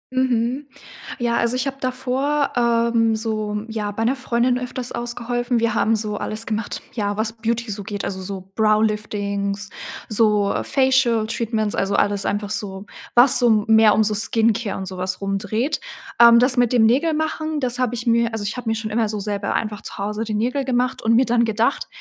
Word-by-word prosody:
Mhm. 255 Hz, +2 st, 0 dB, 0.5 s
Ja, 235 Hz, -1 st, 0 dB
also 235 Hz, +1 st, +1 dB
ich 255 Hz, +1 st, -1 dB
habe 275 Hz, -1 st, -3 dB
davor, 265 Hz, +3 st, -1 dB
ähm, 230 Hz, -1 st, +2 dB
so, 215 Hz, -1 st, -3 dB
ja, 215 Hz, -2 st, -3 dB
bei 220 Hz, +2 st, -3 dB
'ner 255 Hz, +4 st, +2 dB
Freundin 250 Hz, -1 st, 0 dB
öfters 250 Hz, 0 st, -5 dB
ausgeholfen. 240 Hz, 0 st, -2 dB
Wir 230 Hz, -1 st, +1 dB
haben 225 Hz, 0 st, +2 dB
so 210 Hz, -1 st, -3 dB
alles 215 Hz, +1 st, -4 dB
gemacht, 215 Hz, -1 st, -4 dB
ja, 205 Hz, -2 st, -2 dB
was 220 Hz, +1 st, -1 dB
Beauty 230 Hz, 0 st, -2 dB
so 205 Hz, 0 st, -5 dB
geht, 205 Hz, -1 st, -5 dB
also 190 Hz, -1 st, -4 dB
so 190 Hz, 0 st, -6 dB
Brow-Liftings, 210 Hz, -2 st, 0 dB, 0.4 s
so 210 Hz, -2 st, +2 dB
Facial-Treatments, 230 Hz, -5 st, +1 dB
also 195 Hz, +1 st, -1 dB
alles 200 Hz, -1 st, +1 dB
einfach 205 Hz, 0 st, -2 dB
so, 195 Hz, -2 st, -4 dB, 0.3 s
was 245 Hz, +1 st, +8 dB
so 220 Hz, -4 st, +3 dB
mehr 220 Hz, -1 st, +5 dB
um 220 Hz, -, +3 dB
so 215 Hz, 0 st, +1 dB
Skincare 220 Hz, 0 st, +1 dB
und 190 Hz, -, -5 dB
sowas 185 Hz, 0 st, -3 dB
rum 195 Hz, 0 st, -2 dB
dreht. 225 Hz, +9 st, -2 dB, 0.4 s
Ähm, 235 Hz, 0 st, +9 dB
das 250 Hz, +2 st, +3 dB
mit 245 Hz, 0 st, +2 dB
dem 230 Hz, -2 st, +5 dB
Nägel-Machen, 310 Hz, +4 st, 0 dB
das 250 Hz, -2 st, -1 dB
habe 245 Hz, -1 st, 0 dB
ich 235 Hz, -, -6 dB
mir 235 Hz, 0 st, +2 dB
also 220 Hz, -2 st, -3 dB
ich 205 Hz, -, -3 dB
habe 245 Hz, -2 st, -4 dB
mir 225 Hz, -, +1 dB
schon 220 Hz, -1 st, -5 dB
immer 220 Hz, -1 st, 0 dB
so 210 Hz, -, -2 dB
selber 200 Hz, 0 st, -3 dB
einfach 215 Hz, -2 st, -3 dB
zu -, -, -8 dB
Hause 210 Hz, +2 st, -3 dB
die 215 Hz, -, -4 dB
Nägel 250 Hz, +6 st, 0 dB
gemacht 250 Hz, -1 st, -1 dB
und 225 Hz, +1 st, +2 dB
mir 260 Hz, -, +4 dB
dann 235 Hz, 0 st, +2 dB
gedacht: 230 Hz, +4 st, 0 dB
225 Hz, 190 wpm, -21 LUFS, 210-245 Hz, 0.5 s, Ähm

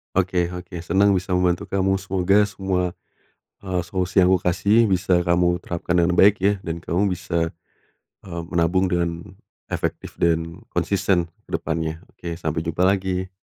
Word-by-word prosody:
Oke 90 Hz, -2 st, +1 dB
oke 90 Hz, 0 st, -8 dB
senang 100 Hz, +2 st, +3 dB
bisa 95 Hz, +1 st, -3 dB
membantu 90 Hz, -1 st, +2 dB
kamu, 95 Hz, 0 st, +2 dB
semoga 95 Hz, +1 st, +2 dB
semua, 95 Hz, -3 st, -1 dB, 0.7 s
eee, 95 Hz, -2 st, -2 dB
solusi 90 Hz, +2 st, -3 dB
yang 95 Hz, -, +7 dB
aku 90 Hz, -, +2 dB
kasih 100 Hz, +6 st, +3 dB
bisa 90 Hz, -1 st, +2 dB
kamu 85 Hz, 0 st, +2 dB
terapkan 85 Hz, 0 st, -3 dB
dengan 90 Hz, +1 st, +2 dB
baik 105 Hz, +1 st, +7 dB
ya 100 Hz, +2 st, +4 dB
dan 85 Hz, 0 st, -4 dB
kamu 95 Hz, +3 st, 0 dB
bisa, 85 Hz, -2 st, -2 dB, 0.7 s
eee, 85 Hz, -2 st, -5 dB
menabung 90 Hz, +3 st, +2 dB
dengan 85 Hz, -1 st, -1 dB, 0.5 s
efektif -, -, -4 dB
dan 85 Hz, 0 st, 0 dB, 0.2 s
konsisten 95 Hz, -4 st, +1 dB, 0.2 s
ke -, -, -2 dB
depannya. 80 Hz, +1 st, -3 dB
Oke, 85 Hz, -1 st, -6 dB
sampe 80 Hz, -2 st, -2 dB
jumpa 85 Hz, +2 st, -1 dB
lagi. 95 Hz, -1 st, +1 dB
90 Hz, 150 wpm, -22 LUFS, 85-95 Hz, 0.7 s, yang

